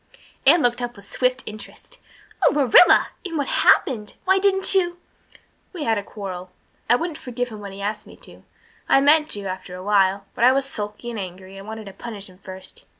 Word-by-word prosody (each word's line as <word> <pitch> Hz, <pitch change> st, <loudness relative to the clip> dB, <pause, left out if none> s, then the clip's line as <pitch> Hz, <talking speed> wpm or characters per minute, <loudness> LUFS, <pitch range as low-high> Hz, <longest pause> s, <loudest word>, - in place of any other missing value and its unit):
Anne 325 Hz, +3 st, +7 dB
looked 245 Hz, 0 st, +1 dB
up 240 Hz, 0 st, -4 dB
with 200 Hz, -1 st, -14 dB
swift 255 Hz, +5 st, -1 dB
interest. 215 Hz, -, -10 dB, 0.4 s
"Oh, -, -, +6 dB
Marilla 290 Hz, +3 st, +6 dB
and 345 Hz, -4 st, -4 dB
what 285 Hz, -, 0 dB
happened? 220 Hz, -5 st, +2 dB
why 380 Hz, +1 st, +4 dB
didn't 385 Hz, -1 st, +3 dB
you 350 Hz, -2 st, +1 dB, 0.4 s
" -, -, -29 dB
"We 340 Hz, -5 st, -5 dB
had 225 Hz, -4 st, +1 dB
a -, -, -7 dB
quarrel. 185 Hz, -3 st, -7 dB, 0.4 s
I -, -, +6 dB
wouldn't 320 Hz, +3 st, -4 dB
forgive 245 Hz, 0 st, -4 dB
him 215 Hz, -2 st, -9 dB
when 200 Hz, -1 st, -8 dB
he 195 Hz, +1 st, -8 dB
asked 210 Hz, +1 st, -4 dB
me -, -, -13 dB
to. -, -, -15 dB, 0.5 s
I -, -, +6 dB
meant 300 Hz, +2 st, +4 dB
to, 205 Hz, -1 st, -4 dB
after 185 Hz, -1 st, -6 dB
awhile 195 Hz, 0 st, +1 dB
but -, -, -2 dB
I 255 Hz, +2 st, +7 dB
was 275 Hz, 0 st, 0 dB
sulky 210 Hz, -1 st, -6 dB
and 225 Hz, -, -5 dB
angry 185 Hz, 0 st, -8 dB
and 195 Hz, +1 st, -10 dB
I -, -, -7 dB
wanted 220 Hz, 0 st, -7 dB
to 195 Hz, -, -10 dB
punish 205 Hz, -4 st, -8 dB
him 185 Hz, 0 st, -19 dB
first. 190 Hz, -1 st, -11 dB
220 Hz, 210 wpm, -22 LUFS, 200-275 Hz, 0.5 s, Anne